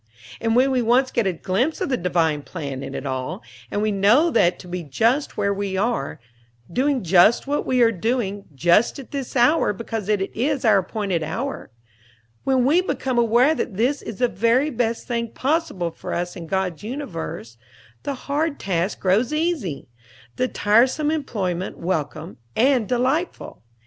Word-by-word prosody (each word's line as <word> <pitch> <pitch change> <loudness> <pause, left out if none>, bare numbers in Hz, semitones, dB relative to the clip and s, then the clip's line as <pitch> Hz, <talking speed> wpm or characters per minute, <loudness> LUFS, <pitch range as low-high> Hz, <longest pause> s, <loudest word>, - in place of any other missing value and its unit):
And 225 0 0
when 260 +2 +4
we 255 -1 +2
once 250 +3 +3
get 235 -4 +1
a 190 - +1
glimpse 205 - -1
of - - -2
the 260 - +2
Divine 165 -6 0
Plan 140 -4 -6
in 135 - -6
it - - -5
all, 130 -2 -4 0.3
and 205 -1 -1
know 265 +12 +5
that 180 - +3
to - - -12
be 180 0 -4
just 230 - 0
where 200 -1 +1
we 200 -1 -3
are, 210 - -1 0.5
doing 270 +1 +1
just 180 +6 +5
what 285 +1 -1
we 255 -2 +3
are 230 - +5
doing 205 -1 -2
just 175 - +3
at 275 - -10
this 275 -3 -5
hour 245 0 +4
because 220 -1 -5
it 200 -2 0
is 270 +2 0
our 210 -3 +6
appointed 195 -3 -2
hour, 265 - -4 0.7
when 260 -2 +2
we 315 +7 +4
become 260 -8 -1
aware 235 +6 +4
that 220 -10 -4
this 260 +6 +1
is 225 - -7
the 250 - +3
very 235 - +2
best 235 -2 -1
thing 235 -1 -1
possible 265 - -1
for - - -6
us 175 0 -3
in 165 -2 -8
God's 185 -3 -2
universe, 170 - -6 0.4
the 280 - -3
hard 290 +3 -2
task 185 0 -1
grows 205 +7 +2
easy, 305 - -2 0.5
the 255 - 0
tiresome 255 +8 +2
employment 195 - -3
welcome 165 -1 -3 0.2
and 250 -2 +3
delightful. 260 +8 -1
225 Hz, 170 wpm, -22 LUFS, 185-260 Hz, 0.7 s, our